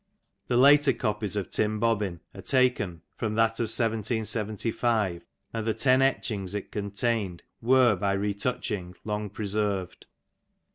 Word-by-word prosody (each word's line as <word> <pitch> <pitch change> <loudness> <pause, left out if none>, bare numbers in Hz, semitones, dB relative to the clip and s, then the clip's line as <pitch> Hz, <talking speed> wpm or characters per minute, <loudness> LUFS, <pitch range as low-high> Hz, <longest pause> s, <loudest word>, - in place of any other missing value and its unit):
The 120 - +1
later 140 +1 +6
copies 105 -3 0
of 100 -3 -3
TVm 105 0 +1
Bobbin 105 -6 0
are - - -9
taken 125 - +1
from 110 -1 -2
that 115 0 +2
of 115 - +1
1775, 110 -3 -1 0.3
and 115 -1 -3
the 110 - +1
ten 130 0 +3
etchings 105 -7 0
it 100 - -5
contained 100 -2 -2 0.2
were 125 -2 +5
by 100 +1 0
retouching 100 -2 -2
long 105 -1 -3
preserved. 100 -3 -3
110 Hz, 130 wpm, -27 LUFS, 100-115 Hz, 0.3 s, later